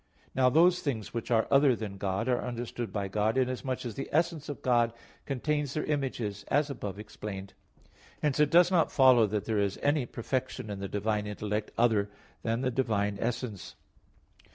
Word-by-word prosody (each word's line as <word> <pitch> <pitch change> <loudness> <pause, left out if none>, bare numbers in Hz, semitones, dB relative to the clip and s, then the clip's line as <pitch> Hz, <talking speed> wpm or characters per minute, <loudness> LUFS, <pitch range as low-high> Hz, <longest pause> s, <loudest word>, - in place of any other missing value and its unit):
Now 130 -1 +4
those 175 +6 +4
things 115 -8 -3
which 115 0 -4
are 115 -2 +3
other 140 -2 +5
than 105 -3 -6
God 95 +4 -1
are 125 -1 +1
understood 120 -1 -4
by 100 -2 -2
God, 105 +4 0
inasmuch 130 0 -1
as 120 - -4
the 135 - -5
essence 160 -1 0
of 145 - -6
God 120 -2 +3 0.3
contains 145 +1 -1
their 155 - 0
images 125 -9 -2
as 145 +1 +1
above 100 -7 -5
explained; 105 -2 -7 0.7
hence 150 -1 0
it 150 -1 +5
does 175 +2 +6
not 175 -3 +3
follow 130 -5 +6
that 105 0 -2
there 110 -2 0
is 100 -1 0
any 145 -3 +2
perfection 125 -2 -3
in 100 - -5
the 100 - -4
divine 105 +1 -1
intellect 105 +1 -3
other 110 -4 +3 0.3
than 115 +1 -1
the 130 -1 0
divine 105 -5 0
essence. 115 -4 -3
120 Hz, 175 wpm, -29 LUFS, 105-135 Hz, 0.7 s, does